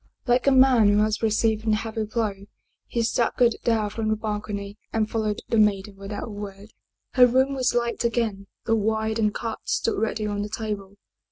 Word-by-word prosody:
Like 245 +1 +2
a - - +7
man 260 -4 +6
who 205 - +3
has 215 0 -1
received 220 0 +1
a 215 - +4
heavy 220 0 -3
blow 215 -1 -1 0.5
he 235 - -1
staggered 235 +1 +2
down 220 -3 +1
from 220 0 -3
the 215 - +2
balcony 210 -1 -5
and 220 -1 0
followed 215 -2 -2
the 230 - +2
maiden 205 -1 +2
without 195 +3 -6
a - - -8
word. 205 0 -8 0.4
Her 250 -1 +6
room 260 +3 +2
was 255 -3 0
light 235 0 0
again, 225 -4 -1 0.2
the 225 - +2
wine 220 +1 0
and 210 -1 +2
cards 225 +1 -4
stood 225 - 0
ready 215 0 -1
on 205 -1 -2
the 205 - -4
table. 205 -3 -5
220 Hz, 190 wpm, -24 LUFS, 210-230 Hz, 0.5 s, a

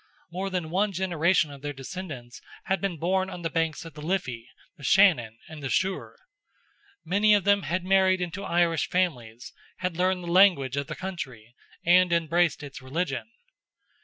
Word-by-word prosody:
More 190 +3 -3
than 180 -4 -3
one 200 +3 +1
generation 175 -3 +1
of 140 -1 -11
their 145 0 -4
descendants 135 -4 -8 0.2
had 190 - -1
been 195 -4 -2
born 185 +4 0
on 180 -2 -8
the 165 - -2
banks 165 0 -1
of 165 - -10
the 150 - -10
Liffey, 130 -9 -3 0.3
the 145 - -16
Shannon, 130 - +4
and 155 -2 -10
the 135 - -4
Suir. 190 +5 -1 0.9
Many 205 +4 +4
of 205 - +1
them 200 0 +3
had 175 +3 -2
married 190 0 +3
into 180 +2 -4
Irish 170 -3 +1
families, 125 -11 -2 0.2
had 180 -2 -3
learned 180 0 +1
the 170 - -4
language 170 -9 +5
of 140 -1 -2
the 155 - -5
country, 130 - -7 0.3
and 180 +1 +5
embraced 170 -2 +1
its 140 -1 -9
religion. 135 - -3
170 Hz, 170 wpm, -26 LUFS, 145-185 Hz, 0.9 s, language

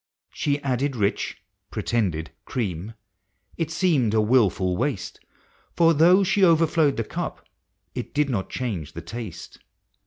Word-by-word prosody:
She 145 0 0
added 135 +1 0
rich 100 -3 -1 0.3
(pretended) 90 -9 -1
cream 105 -2 -4 0.3
— 95 - -35
it 165 - 0
seemed 155 - +2
a - - +4
wilful 105 -5 +3
waste, 120 -3 -2 0.6
For 165 -1 +5
though 175 +6 +6
she 195 +1 +2
overflowed 165 -4 +4
the 115 - 0
cup, - - -5 0.5
it - - -5
did 150 0 +1
not 105 -8 -2
change 100 - -4
the 85 - -6
taste. 105 +2 -8
125 Hz, 135 wpm, -24 LUFS, 100-155 Hz, 0.6 s, though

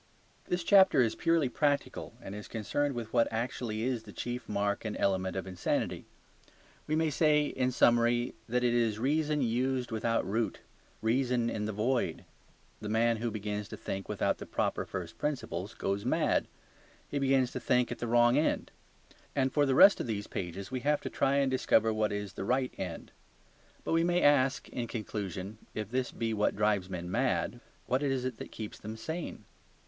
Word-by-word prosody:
This 180 -1 -1
chapter 190 -8 +6
is 115 - 0
purely 165 -4 +2
practical 145 +2 -1
and 95 - -7
is 105 0 -7
concerned 135 +6 -1
with 115 -2 -5
what 115 -2 +4
actually 115 -1 -3
is 125 -2 0
the 110 -2 -12
chief 120 +2 -5
mark 100 -1 0
and 110 -2 -3
element 95 -1 0
of 95 - -3
insanity; 90 -2 -2 0.8
we 155 - +1
may 160 -1 +1
say 150 0 +3
in 130 -3 0
summary 120 0 +3 0.2
that 125 +1 +1
it 120 -1 +3
is 115 -3 +2
reason 150 +4 +1
used 125 +1 0
without 115 0 0
root, 110 +3 -1 0.4
reason 120 0 +1
in 105 -1 -2
the 110 - -2
void. 115 +5 -1 0.5
The 105 - -5
man 115 +1 +2
who 115 +2 -2
begins 105 -1 -4
to - - -8
think 95 0 -5
without - - 0
the - - -8
proper - - -1
first 85 -3 -6
principles 115 - -3
goes 100 +1 -2
mad; 155 +7 +1 0.6
he 145 - -2
begins 135 -2 +2
to - - -4
think 125 -1 +2
at - - -5
the 120 - -3
wrong 120 +3 +5
end. 155 - 0 0.6
And 135 -2 +1
for 145 -1 +3
the 135 - +2
rest 200 +7 +8
of - - -3
these 105 -2 -2
pages 95 +4 -5
we 130 - -2
have 145 +3 +1
to - - -5
try 135 +1 +2
and 140 -1 +2
discover 115 -3 +3
what 110 -1 +1
is 105 -1 -4
the - - -5
right 125 +4 0
end. 90 -3 -6 0.7
But - - -1
we 165 0 +4
may 175 +1 +2
ask 135 -2 +3
in 120 -1 -4
conclusion, 105 -2 -5 0.2
if 110 0 -4
this 130 0 -1
be 115 -1 -2
what 105 -1 +1
drives 105 -3 +1
men 90 -1 -5
mad, - - 0 0.3
what 130 +2 +1
is 135 -3 0
it 130 -3 -3
that - - -8
keeps 110 -2 -7
them 110 +1 -7
sane? 160 +9 -5
120 Hz, 190 wpm, -31 LUFS, 105-135 Hz, 0.8 s, rest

